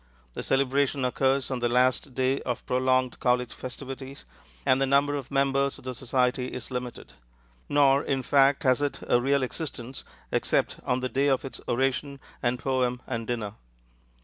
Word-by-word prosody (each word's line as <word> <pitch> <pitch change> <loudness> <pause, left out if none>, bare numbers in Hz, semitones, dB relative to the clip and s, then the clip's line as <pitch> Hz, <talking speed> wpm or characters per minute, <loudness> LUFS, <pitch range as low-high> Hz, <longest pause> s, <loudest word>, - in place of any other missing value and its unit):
The - - -4
celebration 135 0 +1
occurs 135 +1 +1
on 130 - -1
the 120 0 +1
last 125 +1 +2
day 130 +1 +1
of 125 -2 -4
prolonged 130 0 +1
college 125 -1 +1
festivities, 135 +1 -8 0.4
and 130 -1 +3
the 135 - +3
number 140 +1 +3
of 140 -3 -5
members 140 0 +1
of - - -15
the 130 0 -4
society 125 0 0
is 125 0 -7
limited; 125 - -6 0.6
nor, 140 -1 +4
in 135 -2 -1
fact, 140 0 +4
has 130 +1 +3
it 145 -1 -1
a 120 - +3
real 140 +1 +2
existence 130 -2 -5 0.3
except - - +1
on 125 0 +1
the 130 - -1
day 135 +2 +1
of 135 -1 +1
its 135 - -8
oration 135 +3 0 0.2
and 120 0 +1
poem 125 -2 -1
and 115 -3 -4
dinner. 110 -4 -3
130 Hz, 170 wpm, -27 LUFS, 125-135 Hz, 0.6 s, nor